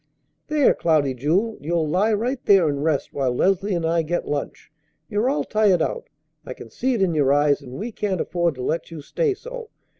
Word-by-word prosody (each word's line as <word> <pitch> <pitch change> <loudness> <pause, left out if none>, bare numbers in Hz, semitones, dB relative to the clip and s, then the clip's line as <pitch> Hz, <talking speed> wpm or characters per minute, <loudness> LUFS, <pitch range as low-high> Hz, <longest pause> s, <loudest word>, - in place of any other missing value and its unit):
"There, 300 -2 +3
Cloudy 150 -5 +1
Jewel! 175 - 0
You'll 160 +1 -1
lie 190 +8 +2
right 245 +5 -1
there 195 -5 +5
and 140 -1 -2
rest 155 -3 -1
while 135 -3 0
Leslie 195 +5 +1
and 170 -1 -1
I 165 +1 +2
get 170 +2 -3
lunch. 145 0 -5 0.4
You're 210 +8 0
all 290 - 0
tired 205 -5 +2
out; 475 - -4 0.3
I - - -8
can - - -12
see 260 0 -1
it 205 - +1
in 180 -3 +1
your 145 -3 +2
eyes; 145 0 +3
and 130 -3 -11
we 215 - -5
can't 200 -4 -2
afford 170 -3 -1
to 130 - -6
let 165 +6 -2
you 165 -3 -8
stay 435 - 0
so. 485 +2 -9
175 Hz, 210 wpm, -22 LUFS, 150-220 Hz, 0.4 s, there